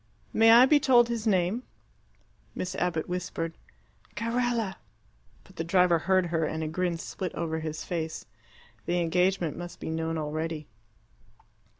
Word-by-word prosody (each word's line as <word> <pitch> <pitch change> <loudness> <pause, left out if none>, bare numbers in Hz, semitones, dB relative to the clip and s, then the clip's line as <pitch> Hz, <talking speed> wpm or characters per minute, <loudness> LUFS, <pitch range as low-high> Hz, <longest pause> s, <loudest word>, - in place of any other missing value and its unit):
"May 225 0 +5
I 240 +2 +9
be 290 +2 +5
told 245 -4 +5
his 230 -1 -2
name?" 190 +3 +2 0.9
Miss 185 +1 -3
Abbott 175 -3 -1
whispered, 165 -2 -3 0.6
"Carella." 230 -3 -1 0.7
But 190 - -20
the 165 - -1
driver 175 0 +3
heard 185 +2 +2
her, 165 -1 +1
and 160 +1 -2
a - - -2
grin 175 +2 -1
split 185 +2 -5
over 160 -1 -2
his 155 -1 -5
face. 160 -2 -4 0.6
The 175 +1 +1
engagement 175 0 +1
must 175 0 -8
be - - -4
known 160 0 -2
already. 155 0 -3
175 Hz, 140 wpm, -28 LUFS, 160-195 Hz, 0.9 s, I